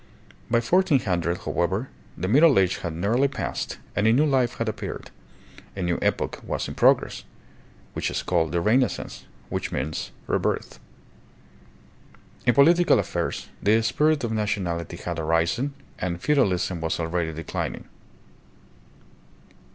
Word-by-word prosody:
By 115 0 +3
1400, 115 - +1
however, 95 +9 -1 0.3
the 90 - -2
Middle 145 - +6
Age 95 -1 +3
had 85 -3 -4
nearly 115 +10 +2
passed 135 -1 -4 0.2
and 100 +3 +2
a - - +6
new 140 +6 +4
life 130 -5 +2
had 115 - -2
appeared, 110 - -5 0.6
a 95 - -3
new 85 -1 0
epoch - - -1
was - - -3
in - - -6
progress, - - +3 0.7
which - - -1
is - - -3
called 80 -3 +1
the 85 0 0
Renaissance, 120 +6 0 0.2
which - - -3
means 70 +4 -3
" - - -27
rebirth." - - -1 1.7
In 120 - +5
political 170 +6 +5
affairs - - -2
the 110 +2 +4
spirit 150 +5 +2
of 115 - -1
nationality 90 -6 -2
had 85 -1 -4
arisen, 85 - 0 0.2
and 85 -2 -2
feudalism 95 - +1
was 80 +1 -1
already 85 0 -1
declining. 80 0 -4
100 Hz, 135 wpm, -25 LUFS, 85-130 Hz, 1.7 s, Middle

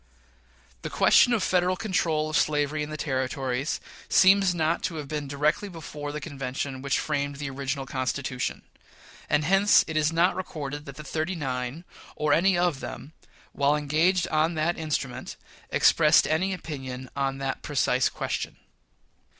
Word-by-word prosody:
The - - -5
question 245 - +5
of 230 -4 +2
Federal 180 0 +2
control 170 -6 0
of 155 - -3
slavery 150 0 +1
in 150 - -3
the 155 - -5
Territories 130 -1 -2 0.3
seems 190 -1 +5
not 160 0 +1
to 165 - -3
have 150 -3 -5
been 150 -1 -4
directly 150 +8 0
before 150 -4 -7
the 150 - -4
convention 135 -3 -5
which 140 0 0
framed 145 -2 -2
the 140 -1 -5
original 135 0 -3
Constitution; 130 -1 -3 0.7
and 150 0 +2
hence 195 +4 +5
it 160 - -5
is 155 0 +2
not 170 +3 +3
recorded 145 -5 -5
that 140 - -8
the 155 - -9
"thirty 160 +4 -2
nine," 130 0 -4 0.3
or 150 -1 +1
any 185 +3 +3
of 175 -5 +1
them, 150 - -8 0.4
while 145 +1 +2
engaged 160 +5 +2
on 155 +2 +1
that 165 +3 +1
instrument, 150 -5 -3 0.3
expressed 155 -1 +5
any 170 +5 +1
opinion 135 -7 -6
on 135 -1 -1
that 135 -1 -3
precise 130 -3 +1
question. - - -4
150 Hz, 155 wpm, -26 LUFS, 140-165 Hz, 0.7 s, question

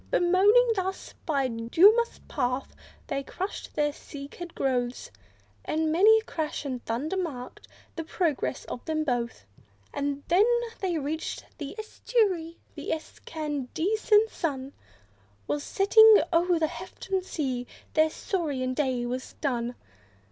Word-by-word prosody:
Bemoaning 405 +7 +5
thus, 380 0 -3
by 280 -4 +2
dumous 340 - +4
path, 250 +2 -2 0.3
they 275 0 -2
crushed 375 +8 -6
the 295 -1 +1
cycad's 295 +5 -9
growth, 250 -2 -1 0.5
And 315 0 0
many 415 +7 +6
a 440 - -2
crash, 310 -7 -4
and 255 -3 -4
thunder, 270 +11 -2
marked 295 -10 -5 0.3
the 330 - -3
progress 320 -5 -1
of 240 - -6
them 310 -1 0
both. 240 - -2 0.5
And 285 0 -2
when 420 +8 +4 0.2
they 360 -4 -1
reached 310 +2 -3
the 290 +4 -6
estuary, 415 -7 0 0.2
the - - -7
excandescent 320 - 0
sun 275 -4 -3 0.7
Was 145 +5 -2
setting 440 +2 +7
o'er 345 +1 +3
the 320 - +2
hefted 370 +3 -4
sea; 260 -9 -3 0.3
their 315 0 +4
saurian 290 -8 -2
day 255 -3 0
was 250 +1 -4
done. 245 -4 -2
315 Hz, 125 wpm, -27 LUFS, 265-375 Hz, 0.7 s, setting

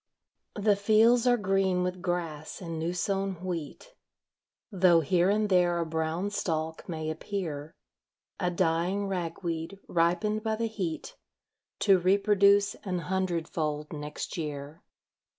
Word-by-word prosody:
The 205 0 +4
fields 225 +4 +4
are 245 0 +5
green 195 -3 +1
with 180 0 -3
grass 170 -4 -3
and 165 -3 -5
new 165 +2 -1
sown 195 +1 -1
wheat, 180 - -6 0.8
Tho' 180 -4 +5
here 175 +4 +2
and 210 +1 +2
there 180 -3 +3
a 170 - 0
brown 160 +4 -2
stalk 160 -4 -3
may 160 -2 -3
appear, 160 -4 -5 0.6
A 180 - +1
dying 175 +3 0
rag 180 -3 -3
weed, 165 +2 -3
ripened 180 +6 +1
by 220 0 -1
the 230 +1 -1
heat, 190 -8 -4 0.7
To 195 -3 +5
reproduce 200 +2 +4
an 185 -3 -2
hundred 175 -2 -1
fold 150 -1 -3
next 150 +2 -5
year. 150 -1 -5
180 Hz, 135 wpm, -29 LUFS, 165-200 Hz, 0.8 s, are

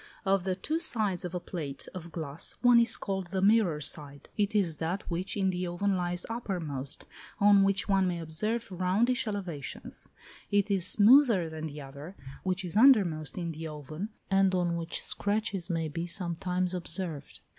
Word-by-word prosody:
Of 195 -1 +2
the 185 -1 0
two 310 - -1
sides 215 - +1
of 180 0 -5
a - - -1
plate 150 -6 -6
of 170 -2 -8
glass 155 -2 -4
one 245 -1 +7
is 230 -1 +3
called 190 -2 -3
the 190 +2 -2
mirror 195 -5 +4
side; 145 -2 -4
it 210 0 0
is 175 -7 +1
that 170 +4 -2
which 180 +4 -2
in 190 -1 +2
the 180 0 -2
oven 190 +3 0
lies 175 -1 -1
uppermost, 165 - -3 0.3
on 205 -1 +6
which 195 -2 +2
one 195 -2 +3
may 175 -1 -1
observe 200 +8 -3
roundish 200 +8 +1
elevations: 180 -9 -5 0.4
it 205 0 +2
is 185 -3 +2
smoother 215 - +6
than 160 0 -5
the 150 0 -8
other, 140 +6 -10 0.3
which 185 0 -2
is 175 - -4
undermost 200 - +4
in 170 -2 -2
the 160 +1 -6
oven, 155 +6 -6 0.2
and 195 -1 +4
on 175 -2 +1
which 165 0 -4
scratches 205 -3 -2
may 165 -2 -1
be 165 +3 -4
sometimes 180 +1 -1
observed. 170 -4 -5
180 Hz, 175 wpm, -29 LUFS, 165-200 Hz, 0.4 s, one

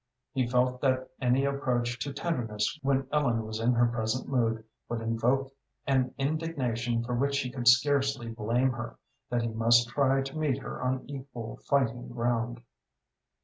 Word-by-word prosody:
He 130 -2 +1
felt 125 +1 +1
that 130 -1 +1
any 130 +2 +3
approach 125 -3 0
to 140 - -3
tenderness 135 -3 -2
when 135 0 +1
Ellen 120 -7 +1
was 110 0 -4
in 120 +2 +3
her 120 0 +4
present 115 +1 -1
mood 115 -4 +1 0.3
would 120 - -2
invoke 120 +4 0 0.3
an 130 -2 +1
indignation 130 -6 -1
for 125 +1 -3
which 140 +3 +1
he 125 - -4
could 125 -2 -3
scarcely 135 0 +4
blame 115 +3 +1
her, 120 -1 -6 0.3
that 120 -1 0
he 115 - -1
must 115 +1 +4
try 135 +1 +2
to 135 +3 -6
meet 145 -4 +1
her 140 - -7
on 130 0 -1
equal 130 -5 -7
fighting 125 -3 +1
ground. 120 0 -1
125 Hz, 160 wpm, -29 LUFS, 120-135 Hz, 0.3 s, her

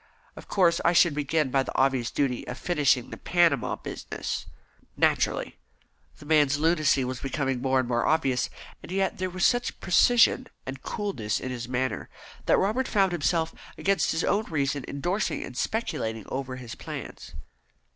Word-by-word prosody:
Of - - -11
course, 175 -3 +3
I 170 - +4
should 170 -2 +5
begin 150 -1 0
by 135 - +3
the - - -5
obvious 130 -3 +2
duty 130 -4 -1
of 125 - -5
finishing 145 -8 +1
the - - -6
Panama 170 -9 +2
business." - - -5 0.5
"Naturally." - - +1 0.6
The - - -13
man's 145 -2 +3
lunacy 155 -4 +2
was 130 0 -4
becoming 135 -2 -2
more 130 0 +2
and 130 - -1
more 120 -1 +1
obvious, 135 -6 +1 0.3
and - - -10
yet 190 -1 0
there 185 0 -1
was 185 0 0
such 245 0 +1
precision 245 +7 +4 0.2
and 130 0 -6
coolness 160 - -2
in 130 - -5
his 120 -1 -5
manner, 130 -2 -2 0.4
that - - +5
Robert 220 +7 +1
found 195 -3 +2
himself 165 0 0 0.2
against 195 0 +1
his 160 - 0
own 210 +2 +1
reason 140 -3 -1
endorsing 175 +9 -2
and 125 - -9
speculating 115 - -2
over 130 -1 -4
his 125 -2 -8
plans. - - -8
145 Hz, 165 wpm, -27 LUFS, 130-175 Hz, 0.6 s, should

